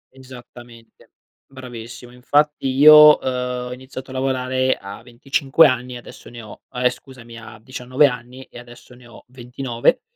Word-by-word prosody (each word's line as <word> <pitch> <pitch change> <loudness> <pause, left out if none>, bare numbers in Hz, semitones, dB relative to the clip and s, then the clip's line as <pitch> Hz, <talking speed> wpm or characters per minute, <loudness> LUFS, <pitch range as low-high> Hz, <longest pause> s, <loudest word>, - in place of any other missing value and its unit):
Esattamente. 120 -3 -16 0.4
Bravissimo. 120 -2 -11
Infatti 145 +3 -1
io, 150 +3 +7
uhm, - - -7 0.4
ho - - -6
iniziato 130 +1 -11
a - - -9
lavorare 130 0 -1
a 100 +1 -11
25 135 +5 +1
anni 125 0 -3
e - - -7
adesso 120 - -14
ne 120 -1 -11
ho 105 -2 -14
ehm, 125 0 0
scusami, 125 -2 -13
a 110 -1 -13
19 130 +3 0
anni 125 0 -8
e - - -14
adesso 120 +1 -16
ne 125 0 -18
ho 115 - -16
29. 125 - -2
125 Hz, 155 wpm, -19 LUFS, 120-130 Hz, 0.4 s, io